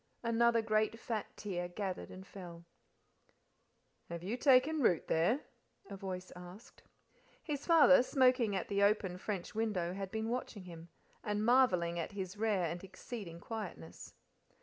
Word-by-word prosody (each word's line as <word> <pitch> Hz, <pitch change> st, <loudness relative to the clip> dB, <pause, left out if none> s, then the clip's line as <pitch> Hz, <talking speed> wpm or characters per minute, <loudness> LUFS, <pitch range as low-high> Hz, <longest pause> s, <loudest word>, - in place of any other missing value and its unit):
Another 230 Hz, 0 st, +3 dB
great 215 Hz, +1 st, +1 dB
fat 225 Hz, -3 st, -3 dB
tear 175 Hz, -4 st, -3 dB
gathered 185 Hz, +1 st, -4 dB
and 185 Hz, +1 st, -10 dB
fell. 175 Hz, -4 st, -10 dB, 1.4 s
"Have 170 Hz, 0 st, -6 dB
you 205 Hz, +6 st, -2 dB
taken 275 Hz, +4 st, +4 dB
root 180 Hz, -9 st, +2 dB
there?" 195 Hz, -, +2 dB, 0.5 s
a -, -, -4 dB
voice 185 Hz, -1 st, -6 dB
asked. 180 Hz, +5 st, -12 dB, 0.6 s
His 290 Hz, -3 st, -4 dB
father, 320 Hz, -6 st, +7 dB
smoking 255 Hz, -5 st, +3 dB
at 190 Hz, -, -2 dB
the 200 Hz, 0 st, 0 dB
open 200 Hz, -3 st, +2 dB
french 195 Hz, -3 st, -4 dB
window, 205 Hz, -6 st, -1 dB
had 195 Hz, 0 st, -5 dB
been 220 Hz, +2 st, -3 dB
watching 235 Hz, -4 st, -4 dB
him, 170 Hz, -1 st, -11 dB, 0.3 s
and 210 Hz, 0 st, -1 dB
marvelling 180 Hz, -9 st, +3 dB
at 170 Hz, -, -4 dB
his 190 Hz, -1 st, -5 dB
rare 210 Hz, -4 st, +1 dB
and 170 Hz, +2 st, -4 dB
exceeding 195 Hz, -2 st, -8 dB
quietness. 175 Hz, -, -7 dB
200 Hz, 145 wpm, -34 LUFS, 180-230 Hz, 1.4 s, father